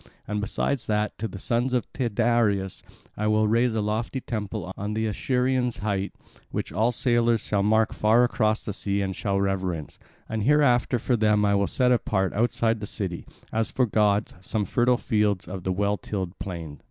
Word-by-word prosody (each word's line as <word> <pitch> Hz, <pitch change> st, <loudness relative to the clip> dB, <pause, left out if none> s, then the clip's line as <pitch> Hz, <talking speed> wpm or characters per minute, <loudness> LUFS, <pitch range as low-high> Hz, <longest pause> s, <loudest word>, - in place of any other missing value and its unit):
And 105 Hz, 0 st, -2 dB
besides 130 Hz, +5 st, -1 dB
that, 105 Hz, 0 st, 0 dB
to 115 Hz, -, -2 dB
the 100 Hz, -, -8 dB
sons 120 Hz, +6 st, 0 dB
of 125 Hz, -, 0 dB
Tyndareus 115 Hz, -5 st, +1 dB, 0.3 s
will 105 Hz, +1 st, +2 dB
I -, -, +3 dB
raise 115 Hz, +2 st, +2 dB
a 110 Hz, -, +1 dB
lofty 110 Hz, +5 st, -2 dB
temple 105 Hz, -6 st, -4 dB
on 105 Hz, +2 st, -4 dB
the 110 Hz, 0 st, 0 dB
Acherusian 125 Hz, +2 st, 0 dB
height, 100 Hz, -1 st, -2 dB, 0.4 s
which -, -, -4 dB
all 110 Hz, +6 st, +2 dB
sailors 120 Hz, -2 st, +2 dB
shall 100 Hz, -2 st, 0 dB
mark 110 Hz, +2 st, +2 dB
far 110 Hz, +3 st, +4 dB
across 110 Hz, -3 st, +1 dB
the 105 Hz, -, -3 dB
sea 100 Hz, 0 st, -1 dB
and 95 Hz, -1 st, -3 dB
shall 100 Hz, -3 st, -1 dB
reverence; 95 Hz, -5 st, -2 dB, 0.3 s
and 110 Hz, -1 st, -2 dB
hereafter 130 Hz, -2 st, +3 dB
for 125 Hz, +2 st, 0 dB
them 105 Hz, -2 st, +3 dB
will 100 Hz, -1 st, +3 dB
I -, -, +3 dB
set 125 Hz, +4 st, +2 dB
apart 95 Hz, -6 st, +1 dB
outside 115 Hz, 0 st, +1 dB
the 105 Hz, -, -5 dB
city, 90 Hz, -5 st, -4 dB, 0.3 s
as 110 Hz, 0 st, 0 dB
for 130 Hz, -, +1 dB
gods, 105 Hz, -1 st, +1 dB
some 105 Hz, +3 st, -2 dB
fertile 120 Hz, +5 st, +2 dB
fields 105 Hz, -5 st, 0 dB
of 95 Hz, 0 st, -6 dB
the 95 Hz, -, -2 dB
well 100 Hz, +2 st, 0 dB
tilled 95 Hz, -3 st, -5 dB
plain." 80 Hz, -7 st, -6 dB
105 Hz, 185 wpm, -25 LUFS, 100-120 Hz, 0.4 s, far